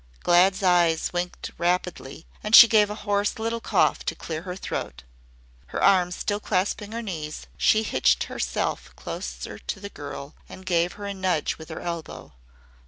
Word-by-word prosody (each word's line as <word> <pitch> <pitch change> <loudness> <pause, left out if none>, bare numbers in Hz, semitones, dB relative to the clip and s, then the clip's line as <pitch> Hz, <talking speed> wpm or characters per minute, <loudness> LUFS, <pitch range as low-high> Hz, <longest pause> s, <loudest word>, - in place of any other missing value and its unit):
Glad's 185 +3 +4
eyes 175 -3 +3
winked 175 0 -4
rapidly 175 -4 -2 0.2
and 210 +1 +5
she 235 - +12
gave 210 -2 +4
a 210 - -4
hoarse 205 0 0
little 230 +1 -2
cough - - +2
to - - -2
clear 160 -1 -5
her 180 0 -6
throat. 65 - -5 0.6
Her - - -3
arms 180 -2 +4
still 205 0 -2
clasping 205 +1 -1
her 230 +1 -4
knees, 155 -7 -6
she 220 0 +3
hitched - - +2
herself - - -3
closer - - -6
to 200 - -5
the 200 +1 -7
girl 145 -2 -8 0.2
and 185 - -11
gave 175 -1 +1
her 205 - -8
a 200 - -3
nudge 185 -6 -1
with 160 - -10
her 160 - -6
elbow. 160 - -6
180 Hz, 170 wpm, -25 LUFS, 170-205 Hz, 0.6 s, she